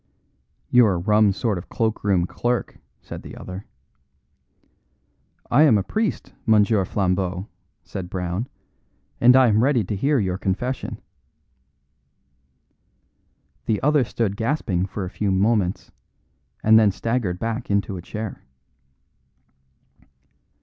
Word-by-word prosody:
"You're 120 -5 +5
a - - -1
rum 105 +3 +3
sort 100 -1 -1
of - - -12
cloak 110 -1 -1
room 95 -4 +2
clerk," 120 +6 -2 0.2
said - - -8
the - - -10
other. 95 +2 -8 1.8
"I 145 - +5
am 145 -9 +6
a 100 - 0
priest, 215 - -2
Monsieur 105 -2 +4
Flambeau," 90 0 -1 0.4
said 90 -2 -7
Brown, 90 +5 -3 0.7
"and 125 +1 +6
I 130 -1 +6
am 110 -1 +3
ready 130 -3 +3
to 100 - -3
hear 140 +8 +1
your 95 -5 -1
confession." 120 +8 -3 2.7
The 110 -3 +1
other 150 -1 +4
stood 110 -3 -2
gasping 110 - -1
for 95 0 -5
a - - -5
few 105 - -2
moments, 95 -1 +1 0.7
and 110 +1 +7
then 110 -2 +5
staggered 105 -2 -2
back 115 +3 -4
into 100 -1 0
a 90 - -6
chair. 110 +3 -6
105 Hz, 120 wpm, -23 LUFS, 95-120 Hz, 2.7 s, and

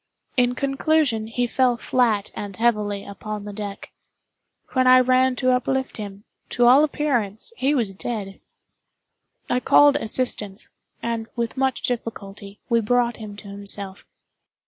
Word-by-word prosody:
In 245 -1 +2
conclusion, 275 -4 +1
he 245 +2 -1
fell 245 0 +2
flat 230 -5 +1
and 200 -2 -6
heavily 210 -3 0
upon 210 +1 -6
the 205 - -7
deck. 200 -1 -7 0.8
When 255 -2 +2
I 255 0 +8
ran 255 0 +3
to 255 0 +2
uplift 260 +1 -1
him, 200 -2 -7 0.3
to 245 - +2
all 260 +5 +7
appearance 270 - 0
he 285 - +1
was 225 -7 0
dead. 195 -1 -5 1.1
I 250 - +1
called 290 +3 +5
assistance, 215 -4 -3 0.3
and, 230 -1 -2
with 235 -1 -2
much 265 -1 0
difficulty, 205 -4 -5
we 235 -2 +2
brought 240 +2 +1
him 215 -2 -8
to 205 - -10
himself. 200 -1 -5
235 Hz, 140 wpm, -23 LUFS, 205-255 Hz, 1.1 s, I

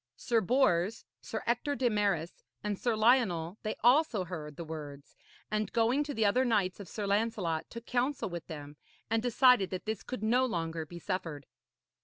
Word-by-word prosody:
Sir 230 -2 +1
Bors, 215 -3 +2 0.2
Sir 220 - -5
Ector 245 +5 0
de 260 -3 +1
Maris 200 -7 0 0.2
and 210 -2 -2
Sir 240 -2 +1
Lionel, 215 -6 +2
they 215 - -3
also 245 - +4
heard 155 -4 -7
the 170 - -5
words, 150 -3 -8 0.4
and 215 0 -1
going 240 +5 +2
to 290 -1 -5
the 220 - +2
other 245 +6 +3
knights 210 -7 +1
of 200 - -9
Sir 210 - -4
Lancelot, 200 -6 0
took 235 0 -9
counsel 255 +3 0
with 175 -3 -6
them, 145 -2 -8 0.3
and 225 0 +2
decided 245 -4 +4
that 185 - -5
this 220 -2 -3
could 255 -4 -6
no 245 +4 +3
longer 165 -8 -2
be 175 - -9
suffered. 170 -6 -4
210 Hz, 180 wpm, -31 LUFS, 170-240 Hz, 0.4 s, also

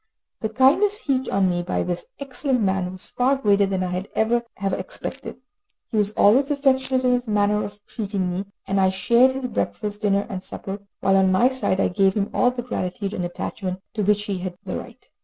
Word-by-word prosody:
The 220 - -2
kindness 300 - +3
heaped 265 -2 0
on 195 -1 +2
me 175 -1 0
by 175 - -1
this 175 -1 -3
excellent 265 -2 -1
man 190 -2 +1
was 185 0 -8
far 255 +3 +1
greater 205 -6 +3
than 190 -1 -1
I 180 0 -2
could 195 - -13
ever 235 +2 +2
have 195 -1 -2
expected. 260 +8 -5 0.5
He 225 - -1
was 205 -1 +3
always 260 +9 +4
affectionate 265 -2 +2
in 250 - +4
his 245 0 -1
manner 210 0 +2
of 205 0 -7
treating 195 -5 -2
me, 185 +3 -3 0.2
and 195 0 +1
I 190 - +4
shared 235 +7 +4
his 265 -1 -4
breakfast, 210 -3 -3
dinner 200 -1 +2
and 190 -2 -5
supper, 195 +1 -7 0.2
while, 195 0 +4
on 190 -1 +4
my 215 +7 +4
side, 260 -8 -1
I - - +3
gave 190 +1 +2
him 205 -1 -1
all 250 - +4
the 250 -1 -4
gratitude 195 -3 -3
and 180 - -2
attachment 185 +1 -4
to 220 - -2
which 205 +1 +2
he 195 -3 -3
had 180 -1 -5
a - - -3
right. - - -9
205 Hz, 215 wpm, -23 LUFS, 190-250 Hz, 0.5 s, always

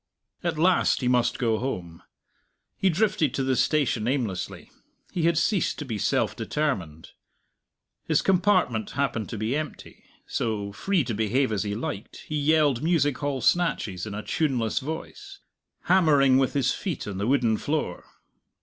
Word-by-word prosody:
At 170 -2 -1
last 180 -1 +3
he 125 - 0
must 125 -1 +2
go 115 -3 +1
home. 90 -10 -5 0.7
He 195 - +2
drifted 170 - +1
to 135 - 0
the 130 0 +1
station 125 -7 +1
aimlessly; 120 -9 -3 0.4
he 170 -2 -1
had 170 -1 +2
ceased 185 +2 +1
to 150 - -5
be 110 -5 -4
self - - +1
determined. 95 - -3 1.0
His - - +2
compartment 185 - +2
happened 120 -6 -1
to 115 - -5
be 110 +5 -1
empty; 155 0 -6 0.2
so, 105 -3 -2
free 185 - 0
to 120 - -3
behave 110 +5 +1
as 105 - 0
he 105 -1 -2
liked, 105 -1 -5
he 155 - -3
yelled 145 -3 +3
music 150 -5 +1
hall 145 -3 -2
snatches 115 - +1
in 100 - -5
a 105 - -5
tuneless 125 -8 0
voice, 170 - -7 0.5
hammering 145 -8 +4
with 135 - +1
his 130 -3 +1
feet 180 -9 -4
on 100 -2 -5
the 100 - -1
wooden 125 -4 +3
floor. 150 +5 -2
135 Hz, 160 wpm, -26 LUFS, 110-155 Hz, 1.0 s, hammering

